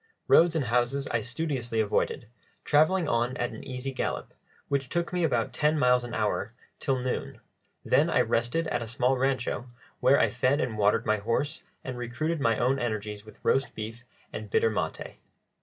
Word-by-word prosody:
Roads 170 0 +6
and 150 -5 +1
houses 125 +4 0
I 115 - +2
studiously 120 -2 -3
avoided, 110 +2 0 0.4
travelling 155 +4 +3
on 120 0 0
at 120 - -1
an - - -9
easy 130 0 -4
gallop, 130 - -3 0.3
which 135 -2 -1
took 170 +3 -2
me 180 -1 +1
about 120 -8 +1
ten 150 +1 +2
miles 125 -3 +4
an 120 -1 -5
hour, 105 0 -1 0.3
till 135 -1 0
noon; 125 0 -3 0.5
then - - +3
I - - +3
rested 120 +9 0
at - - -1
a 115 - -5
small 125 +3 +1
rancho, 130 -1 -1 0.3
where 135 +2 +5
I - - +4
fed 130 +4 +1
and 120 -4 -1
watered 105 -1 +2
my 110 0 +2
horse 120 +9 -1 0.2
and 125 -1 -5
recruited 145 +7 -2
my 115 -4 +2
own 130 +3 +2
energies 105 -3 -3
with 110 - -16
roast 135 0 +2
beef 110 +2 -6 0.3
and 110 -1 -6
bitter 110 - +3
maté. 105 - -4
125 Hz, 180 wpm, -28 LUFS, 115-140 Hz, 0.5 s, Roads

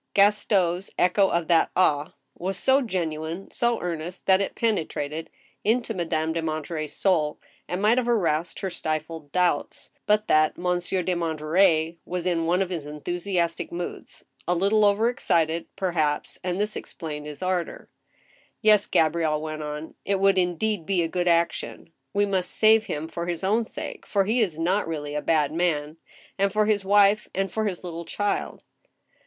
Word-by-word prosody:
Gaston's 195 -3 +3
echo 190 +2 +3
of 170 -2 0
that 170 -1 +4
*' - - -46
ah! 150 -5 +2
" - - -50
was 190 +2 -3
so 265 +1 +3
genuine, 170 - -3
so 235 -1 +1
earnest, 175 +1 -5
that 190 0 +4
it 200 - -3
penetrated 160 -7 -2 0.3
into 230 +1 +1
Madame 160 -3 -1
de 165 - -1
Monterey's 155 -1 -4
soul, 160 -6 +1 0.3
and 180 +3 -3
might 225 +4 +4
have 240 -1 -2
aroused 170 -7 0
her 190 - -2
stifled 155 -2 -4
doubts, 180 +1 0 0.2
but 210 +1 +3
that 155 0 +3
Monsieur 180 +1 -1
de 185 - 0
Monterey 165 0 +2
was 180 -1 -4
in 165 -2 0
one 180 +3 +3
of 190 - -7
his 160 -5 -4
enthusiastic 170 +3 -2
moods, 175 0 -7 0.2
a 175 - +2
little 205 +4 +3
overexcited, 195 -7 +1
perhaps, 155 -6 -1
and 180 +1 -2
this 210 +1 -1
explained 150 -3 -6
his 150 +4 -6
ardor. 185 -2 -2 0.4
" - - -34 0.3
Yes," 210 -1 +5
Gabrielle 160 -1 +2
went 155 0 -5
on, 150 +1 -6
" - - -51
it 195 -1 0
would 195 -1 +4
indeed 180 +2 0
be 185 -3 +2
a - - 0
good 175 +2 -2
action. 170 0 0 0.2
We 205 0 +2
must 190 -3 -1
save 220 0 +4
him 155 -3 -4
for 170 +1 -5
his 175 +1 -3
own 220 +4 +2
sake, - - -7
for 200 -2 +2
he 225 +5 +1
is 180 -8 0
not 180 +5 +1
really 145 -3 -4
a 150 - -1
bad 150 -2 +1
man, 160 -3 -1 0.4
and 200 0 +2
for 215 +1 +2
his 210 -2 +1
wife 205 +1 +4
and 195 0 -1
for 220 0 -1
his 190 -4 -3
little 170 -1 -6
child." 205 +4 -2
175 Hz, 175 wpm, -25 LUFS, 160-200 Hz, 0.4 s, Yes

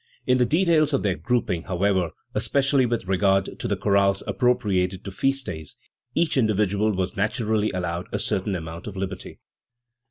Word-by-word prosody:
In 125 0 +3
the 125 - +3
details 155 -1 +3
of 135 - +1
their 100 -3 +2
grouping, 115 -5 -1
however, 95 -1 +1 0.2
especially 135 +4 +2
with 115 -4 -2
regard 95 +1 +1
to - - -3
the - - 0
chorales 100 -1 +2
appropriated 95 -7 +1
to 100 - -6
feast 135 +7 0
days, 80 -2 -7 0.4
each 165 -3 +1
individual 105 -2 +2
was 95 +1 -2
naturally 110 0 0
allowed 85 -1 -3
a - - -1
certain 95 +1 -1
amount 85 +1 -7
of 100 -2 -7
liberty. 95 -1 -5
100 Hz, 160 wpm, -24 LUFS, 95-125 Hz, 0.4 s, In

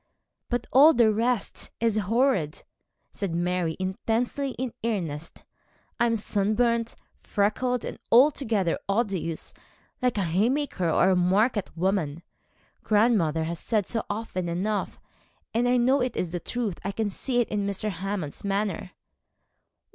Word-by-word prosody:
'But 245 -1 -1
all 295 +5 +7
the 230 -2 +5
rest 230 0 -1
is 230 -2 +1
horrid,' 215 - +1 0.5
said 190 -5 -3
Mary, 175 -1 -1
intensely 230 +8 -1
in 250 -1 -3
earnest. 170 -9 -3 0.6
'I 235 - +4
am 230 - +1
sunburnt, 225 +3 +1 0.2
freckled, 235 +4 0
and - - -6
altogether 230 - +3
odious 195 -6 -1 0.5
like 250 -3 +1
a 200 - +1
haymaker 195 - 0
or 185 +4 +4
a - - +4
market 195 +4 +2
woman. 170 -4 0 0.6
Grandmother 205 -8 +2
has 165 +1 -3
said 215 -4 0
so 225 +2 -1
often 205 -5 -3
enough, 200 +5 -2 0.5
and 235 +2 +2
I 250 - +4
know 255 +3 +3
it 250 -1 -2
is 175 - -1
the 175 - -2
truth. 225 -2 -3
I 195 - -2
can 210 0 -2
see 245 +4 -1
it 240 - +1
in 205 -1 -1
Mr. 200 +2 -2
Hammond's 185 -4 -4
manner.' 200 -2 -2
210 Hz, 140 wpm, -26 LUFS, 180-235 Hz, 0.6 s, all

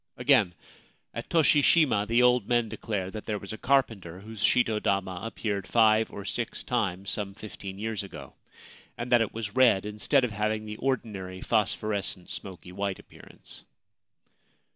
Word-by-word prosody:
Again: 125 -9 +3 0.6
At 115 - -6
Toshi 155 -3 +4
Shima 130 -10 +4
the 120 +3 +3
old 125 -4 +4
men 120 -2 +2
declare 95 -5 -3
that 110 0 -8
there 105 - -1
was 100 +1 -7
a - - -6
carpenter 110 -10 0
whose 110 0 -6
shito 115 -4 +3
dama 95 -2 -1
appeared 105 -3 -3
five 110 -1 +4
or 100 - -8
six 115 +3 -2
times 100 -6 -1
some 100 -2 -2
fifteen 100 -2 -8
years 110 0 -3
ago, 100 - -10 0.6
and 120 +1 -5
that 120 -1 +6
it 110 - 0
was 110 -2 -6
red, 120 -7 +5
instead 105 +6 +1
of 125 - 0
having 110 +1 -1
the 105 0 -6
ordinary 105 -9 -3
phosphorescent 105 -4 -1
smoky 90 +2 -8
white 100 0 -2
appearance. - - -14
110 Hz, 160 wpm, -28 LUFS, 100-120 Hz, 0.6 s, that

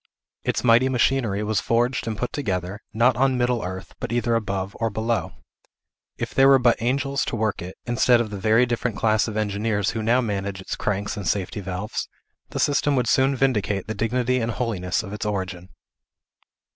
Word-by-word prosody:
Its - - -1
mighty 120 +2 +5
machinery 120 -5 +1
was 105 -1 0
forged 120 +1 0
and 110 -2 -2
put 125 - -3
together, 100 -7 -3
not 115 +3 +3
on 130 0 +2
middle 120 -1 +1
earth, 95 +1 -6
but - - -4
either 120 0 +1
above 100 -3 -2
or 115 - +1
below. 110 +2 -1 0.9
If - - -4
there 135 0 +5
were 135 0 +7
but 120 -3 +2
angels 135 +3 0
to - - -3
work 110 -2 -1
it, 90 +2 -8
instead 120 0 +3
of 115 -3 -2
the 100 - -5
very 110 +5 +4
different 120 -2 -2
class 110 -1 +2
of 110 -1 -4
engineers 105 -1 0
who 110 - -3
now 115 +3 +3
manage 100 -4 -2
its 95 - -5
cranks 100 +1 -2
and 100 -4 -4
safety 100 +3 -1
valves, 95 +2 -4 0.4
the - - -4
system 145 0 +2
would 125 -3 +1
soon 135 +3 +3
vindicate 105 -7 0
the 110 - -4
dignity 125 +4 0
and 115 0 -1
holiness 105 -6 -1
of 100 -1 -8
its 105 - -4
origin. 95 -3 -4
110 Hz, 190 wpm, -24 LUFS, 100-125 Hz, 0.9 s, were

